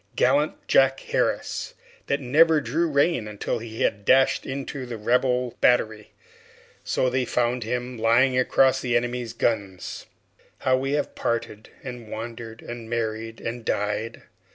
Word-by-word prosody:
Gallant 145 +2 +1
Jack 135 0 +4
Harris, - - -1 0.3
that 140 - +1
never 155 +5 +4
drew 150 +6 0
rein 140 -5 +1
until 105 +2 -3
he 115 0 -7
had 100 0 0
dashed 130 +5 +3
into 135 -1 -5
the 120 -2 -5
Rebel 125 +2 +1
battery! 110 -3 +2 0.7
So 130 - 0
they 130 +1 +1
found 120 0 0
him 125 +1 -3
lying 120 +4 +4
across 130 +1 +3
the 120 -2 +2
enemy's 120 -1 -3
guns. 100 -6 -2 0.5
How 130 - +3
we 135 +2 -1
have 145 - -1
parted, 115 -2 -3
and 125 -3 -7
wandered, 115 0 -7
and 120 -1 -8
married, 115 -1 -3
and 120 +1 -5
died! 105 +2 -2
120 Hz, 140 wpm, -25 LUFS, 115-130 Hz, 0.7 s, Jack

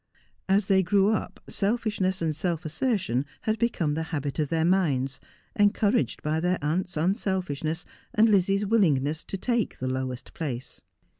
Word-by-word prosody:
As 195 +1 +4
they 190 -1 +4
grew 195 +2 +3
up 220 - -2
selfishness 200 -4 0
and 155 -2 0
self 170 0 -2
assertion 160 - 0 0.2
had 220 0 -1
become 190 -10 +1
the 160 - -1
habit 145 -2 -3
of 150 -2 0
their 165 -1 +1
minds, 145 -8 +1 0.4
encouraged 205 +2 +2
by 155 +1 0
their 180 +2 +1
aunc'i; 170 +4 -2
unselfishness 175 - -1 0.3
and 220 +1 +4
Lizzie's 200 -1 +3
willingness 160 -9 +2
to 195 - -4
take 235 +2 -1
the 130 - -3
lowest 130 -1 -4
place. 130 -6 -5
180 Hz, 150 wpm, -27 LUFS, 150-200 Hz, 0.4 s, As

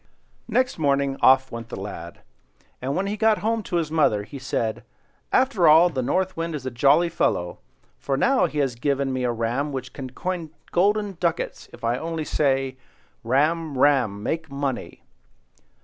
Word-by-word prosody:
Next 250 -2 0
morning 140 -2 +1
off 130 0 +5
went 115 0 -7
the - - -6
lad; 85 -4 -8 0.6
and 135 +2 -2
when 190 +3 0
he 200 +1 -2
got 220 0 +3
home 225 0 +1
to 185 - -5
his 165 -3 0
mother, 125 -10 +2
he 140 +6 -9
said—"After 170 - -1
all, 165 +3 +7
the 130 -4 -2
North 185 +9 0
Wind 165 -1 -3
is 135 -4 -6
a 130 - -3
jolly 140 +8 +4
fellow; 90 - -1 0.4
for 135 -1 -1
now 265 - +3
he 150 - -7
has 135 -4 +1
given 135 +2 -1
me 130 -1 -1
a 120 - +1
ram 120 +6 -1
which 130 -2 -6
can 130 -2 -6
coin 175 +4 -4 0.2
golden 200 +1 +1
ducats 170 -1 -2
if - - -14
I 120 +2 0
only 165 -1 -3
say, 135 -3 0 0.5
'Ram, 150 +4 +1
ram! 125 -8 +2
Make 160 +3 -2
money! 140 -2 -4
140 Hz, 170 wpm, -24 LUFS, 130-170 Hz, 0.6 s, all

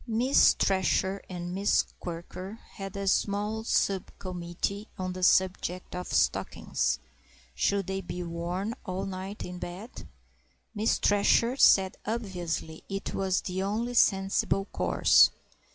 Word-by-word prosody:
Miss 240 +4 +4
Thresher 190 0 +1
and 175 -1 -5
Miss 200 +2 +2 0.2
Quirker 180 +4 -7
had 195 0 -7
a 200 0 -3
small 205 +3 0
sub 195 -4 +1
committee 185 +3 -4
on 185 -1 -3
the 185 - -7
subject 185 -1 +1
of 180 0 -4
stockings—should 200 -1 -1
they 190 +1 -3
be 180 0 -5
worn 175 +5 -3
all 185 -2 -3
night 195 +2 -6
in 180 0 -7
bed? 185 +8 -8 0.7
Miss 215 +1 +1
Thresher 210 +4 +3
said 190 -8 +5
obviously 180 -7 -4
it 195 0 -4
was 190 -1 0
the 185 0 -3
only 220 +5 -1
sensible 195 -2 +2
course. - - +4
195 Hz, 120 wpm, -28 LUFS, 180-205 Hz, 0.7 s, said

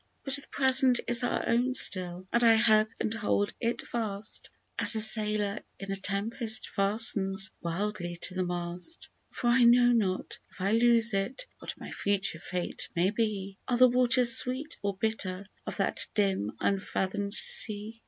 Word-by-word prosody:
But 270 - -4
the 280 - -11
Present 260 -2 +5
is 240 +1 +5
our 245 - -2
own 245 +2 0
still, 185 -3 +1
and 235 0 +2
I 230 -1 +5
hug 215 -1 +3
and 220 - -3
hold 205 -2 -2
it 235 +1 -3
fast, 215 -2 -6 0.3
As - - +10
the 220 - +3
sailor 210 -1 +3 0.2
in 195 0 -8
a - - -2
tempest 220 +4 -1
fastens 195 -2 0
wildly 175 0 -4
to 185 - -4
the 185 0 -2
mast; 175 - -6 0.2
For - - -8
I 245 +2 +3
know 245 +1 +4
not, 200 -6 -2
if - - -20
I 195 +2 -1
loose 230 0 +3
it, 200 - -3
what - - -8
my - - -10
future 195 -5 -3
fate 180 +1 -6
may 180 +3 +1
be; 205 -3 -4
Are 245 - -1
the 255 +1 +6
waters 250 -1 +4
sweet 260 +5 0
or 200 -1 -4
bitter 200 -3 -4 0.2
of - - -6
that - - -2
dim 190 - -1
unfathom'd 200 +1 -3
sea? 215 +1 -1
215 Hz, 165 wpm, -28 LUFS, 195-235 Hz, 0.3 s, As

